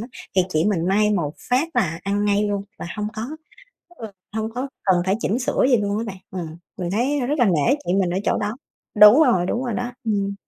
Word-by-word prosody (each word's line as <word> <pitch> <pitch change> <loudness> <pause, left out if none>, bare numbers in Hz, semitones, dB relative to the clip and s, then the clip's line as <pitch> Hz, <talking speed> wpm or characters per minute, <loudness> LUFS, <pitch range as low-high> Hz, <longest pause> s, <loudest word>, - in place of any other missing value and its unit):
á 225 - -6 0.3
thì 185 - +6
chị 155 -1 0
mình 180 -5 0
may 210 +2 +3
một 165 -8 -1 0.2
phát 265 +7 +2
là 165 -2 +1
ăn 205 +1 -1
ngay 205 0 +2
luôn 200 -1 -2 0.2
và - - -6
hông 210 0 -2
có 220 - -4 0.7
ừ, 225 - -7 0.3
hông 220 0 -2
có 260 +2 -3 0.2
cần 180 -3 +3
phải 190 - +2
chỉnh 225 +6 0
sửa 250 0 +1
gì 245 - +6
luôn 205 0 -1
á 230 - -2
bạn. 195 -3 -6 0.3
Ừm. 160 0 -8 0.2
Mình 175 -1 -3
thấy, 255 +8 0
a, 245 - -1
rất 295 +2 -1
là 245 - +5
nể 175 - +3
chị 175 - +1
mình 190 -3 +1
ở 185 - -1
chỗ - - +1
đó. 210 +3 -3 0.4
Đúng 210 +8 +8
rồi, 185 -9 +2
đúng 245 +6 -2
rồi 240 -4 -2
đó. 245 +2 -3
Ừm. 200 -2 -1
205 Hz, 245 wpm, -22 LUFS, 185-240 Hz, 0.7 s, Đúng